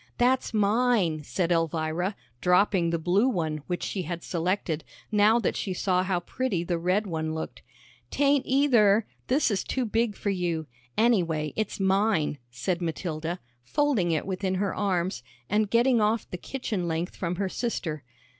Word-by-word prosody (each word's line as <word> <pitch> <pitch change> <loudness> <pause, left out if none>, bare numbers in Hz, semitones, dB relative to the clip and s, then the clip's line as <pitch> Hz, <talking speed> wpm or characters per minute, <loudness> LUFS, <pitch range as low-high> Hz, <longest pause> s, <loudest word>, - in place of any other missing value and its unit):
"That's 255 +2 +2
mine," 210 -6 +2
said 175 +3 -1
Elvira, 165 +3 0 0.3
dropping 180 -1 +3
the 170 - +1
blue 185 +9 +2
one, 160 -9 -1
which 175 -1 -2
she 195 - -2
had 170 0 -5
selected, 170 -2 -1 0.3
now 210 +2 +5
that 235 - 0
she 190 -2 -2
saw 180 0 +1
how 185 -1 0
pretty 195 -2 -2
the 175 -1 -1
red 185 +5 +1
one 160 -3 -2
looked. 160 - -6 0.5
"'Tain't 280 -1 +3
either. 230 -7 +4 0.2
This 265 -1 +2
is 195 - 0
too 260 -2 -1
big 225 -1 0
for 200 - -1
you. 175 -4 -1 0.3
Anyway, 170 - +2
it's 215 -2 -2
mine," 190 -6 +2
said 150 +9 -2
Matilda, 165 +1 -3 0.2
folding 260 - +1
it 160 -2 0
within 190 0 -1
her 195 +1 0
arms, 190 -2 -1 0.3
and 210 0 +1
getting 235 +1 +4
off 215 +1 +1
the - - -3
kitchen 210 -5 -3
length 165 +2 -2
from 175 -1 -2
her 195 +2 -1
sister. 175 - -3
190 Hz, 160 wpm, -27 LUFS, 170-220 Hz, 0.5 s, now